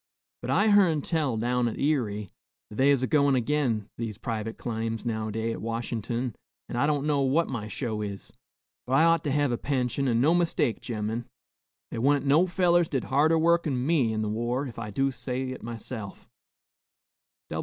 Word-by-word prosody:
But - - -5
I 215 +2 +3
hearn 180 -8 +4
tell, 150 -8 0
down 120 +2 +1
at 115 - -4
Erie, 110 - -1 0.4
that 105 - -9
they 135 +2 +4
is 135 -2 +3
a - - +1
goin' 140 -3 +3
agin 125 -5 0
these 110 -4 -4
private 115 -1 -4
claims 115 -1 -3
nowadays 110 0 -2
at - - -7
Washin'ton, 115 +1 -3 0.3
an' - - -6
I 140 +4 +2
don't 145 -1 0
know 145 -2 +2
what 140 +5 +2
my 115 -5 -4
show 110 0 -3
is. 100 -2 -6 0.5
But 130 - -2
I 135 - +5
ought 165 0 +4
to 145 - 0
hev 145 -1 +2
a 120 - -1
pension, 135 -1 -1
an' 115 -2 +2
no 150 +7 +4
mistake, 170 -9 +1
gemmen. 110 +1 -3 0.6
They - - -4
wa'n't 140 +3 +2
no 155 +6 +4
fellers 175 -2 +3
did 135 -4 -1
harder 155 +4 +4
work 170 +1 +3
'n 130 -3 -1
me 140 -8 +2
in 110 0 -1
the - - -2
war, 120 +5 -1
ef 120 -3 -8
I 105 -2 -5
do 135 +6 0
say 125 +1 -4
it 130 - -7
myself." 115 -2 -7
125 Hz, 190 wpm, -27 LUFS, 115-145 Hz, 0.6 s, I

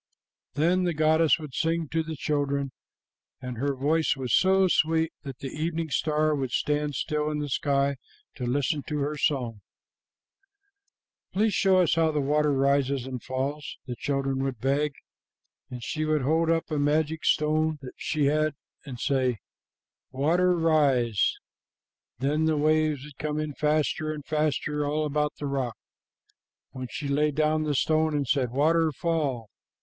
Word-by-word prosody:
"Then 175 +5 +2
the 175 -2 0
goddess 155 +1 +4
would 150 -5 -9
sing 165 +1 0
to 165 - 0
the 160 0 -5
children, 140 -2 -1 0.7
and 125 -2 -6
her 140 +1 0
voice 155 +5 +1
was 130 -3 -3
so 190 0 +4
sweet 160 -1 +2
that 135 -4 -8
the 135 - -6
evening 160 +2 -3
star 155 0 +1
would 135 -3 -2
stand 150 +3 -1
still 150 +3 -1
in 150 - -2
the 150 -1 -2
sky 140 +1 +1 0.4
to 125 -3 -5
listen 145 +3 0
to 150 - -2
her 145 +1 -1
song. 125 -8 -1 1.7
'Please 210 +2 +1
show 190 -1 +3
us 175 - +2
how 165 -1 +3
the 150 - -1
water 150 +1 +2
rises 140 -1 +1
and 130 -2 -5
falls,' 140 +3 -4
the 125 -2 -5
children 135 0 -1
would 135 -2 -2
beg, 140 +3 0 0.8
and 125 -2 -7
she 155 +6 -2
would 155 -2 +1
hold 160 +4 +2
up 165 0 0
a 150 - 0
magic 155 +2 +1
stone 155 +1 +2
that 130 - -8
she 150 -2 -1
had 155 +1 +1 0.3
and 130 -4 -8
say, 130 -3 +1 0.7
'Water, 175 +7 +2
rise!' 140 - +2 0.8
Then 150 +5 +1
the 160 -1 +2
waves 155 -2 +2
would 145 -2 -13
come 150 0 -2
in 155 -1 -3
faster 155 +1 0
and 150 -2 -7
faster 150 -1 0
all 150 +2 0
about 150 0 0
the 145 - -5
rock. 135 -4 -2 0.9
When 130 -1 -6
she 145 - -5
laid 145 +1 +1
down 155 0 +1
the 150 -1 0
stone 155 +2 +2
and 140 -2 -1
said, 130 -2 +1
'Water, 160 +5 +2
fall!' 145 -8 -1
150 Hz, 160 wpm, -27 LUFS, 135-155 Hz, 1.7 s, goddess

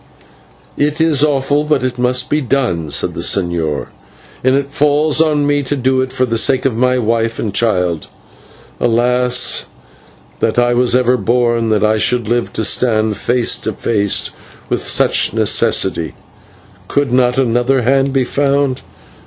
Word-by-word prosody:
"It 150 +2 0
is 160 -3 +2
awful, 145 0 +1
but 150 -4 0
it 125 -1 -3
must 125 0 +1
be 150 +1 0
done," 120 - -1
said - - -1
the - - -7
señor, 80 -8 -1 0.5
"and 130 +1 +3
it 140 0 -2
falls 150 +2 +2
on 150 -2 +1
me 145 0 +1
to 140 +1 -3
do 130 0 0
it 130 0 -3
for 130 - 0
the 115 -2 -1
sake 130 +3 +1
of 130 -4 0
my 125 +2 +1
wife 115 -1 -1
and 105 -3 -3
child. 90 -7 0 0.7
Alas! 125 +1 +1 0.7
that - - -1
I 120 0 +2
was 125 0 +2
ever 125 0 +2
born, 120 -1 0
that 110 -1 +1
I 110 0 +2
should 120 0 0
live 120 +1 -1
to 110 - -2
stand 110 -3 +1
face 120 +2 0
to - - -4
face 100 -4 -1 0.4
with - - -2
such - - +2
necessity. 80 -2 +1 0.7
Could 140 -3 -1
not 125 -1 +2
another 125 +1 +1
hand 135 +2 +1
be 135 -1 +1
found? 140 0 0
125 Hz, 160 wpm, -15 LUFS, 115-135 Hz, 0.7 s, and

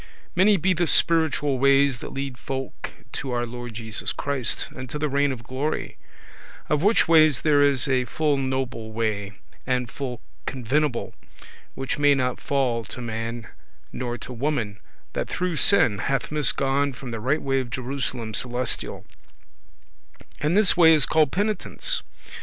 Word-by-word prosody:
Many 195 +3 +5
be 185 +2 +2
the 175 -1 0
spiritual 155 -6 +2
ways 140 -1 +4
that - - -7
lead 135 -1 -4
folk 135 +1 -6 0.2
to 135 - -5
our 120 0 0
Lord 120 -1 -8
Jesus 110 0 -3
Christ, 140 -5 -2
and 130 -1 -7
to 150 - -4
the 150 +1 0
reign 140 0 +1
of 120 -3 -6
glory; 135 +6 -3 0.7
of 150 -1 +1
which 210 +5 +3
ways 155 -4 +5
there 150 -2 +3
is 140 -2 +3
a 130 -2 +1
full 150 +4 0
noble 130 -4 -3
way, 105 -3 -2 0.3
and 125 -2 -1
full 125 -4 -5 0.3
convenable, 130 +1 -1 0.6
which 135 +2 -3
may 145 -1 +5
not 125 -2 -1
fail 130 -5 0
to 125 - -6
man 115 0 -4 0.5
nor 120 -1 -3
to 125 - -8
woman, 120 -6 -2 0.3
that - - -3
through 180 -2 -2
sin 115 - +5
hath 135 +5 -1
misgone 140 -2 +1
from 125 0 -8
the 115 - -4
right 135 +8 0
way 135 -1 +1
of 130 -2 -4
Jerusalem 125 -2 -4
celestial; 125 +2 -2 1.3
and 155 +6 +1
this 210 -3 +5
way 165 -2 +7
is 150 - +5
called 155 -4 +2
penitence. 215 - +1
135 Hz, 155 wpm, -24 LUFS, 120-150 Hz, 1.3 s, way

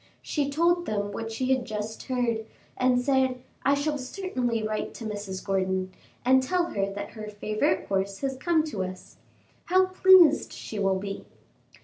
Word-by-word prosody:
She 285 -2 -1
told 345 +4 +2
them 205 -1 -1
what 225 +1 -5
she 255 +3 -1
had 260 -1 0
just 215 -1 -5
heard, 235 -4 -1 0.3
and 255 -1 +3
said: 260 -1 +1 0.2
"I 280 - +4
shall 290 +1 -1
certainly 255 - -2
write 215 0 -3
to 230 - -7
Mrs. 205 -3 -5
Gordon, 190 -1 0 0.3
and 260 +1 +5
tell 345 +6 0
her 195 -1 -1
that 205 +1 -6
her 215 -2 -8
favorite 210 -2 0
horse 195 0 -1
has 270 -1 -1
come 320 +3 +2
to 245 -12 -3
us. 185 0 -8 0.5
How 375 +1 +4
pleased 370 -4 +6
she 215 - -6
will 195 -1 +2
be!" 195 +1 -5
240 Hz, 165 wpm, -27 LUFS, 205-280 Hz, 0.5 s, pleased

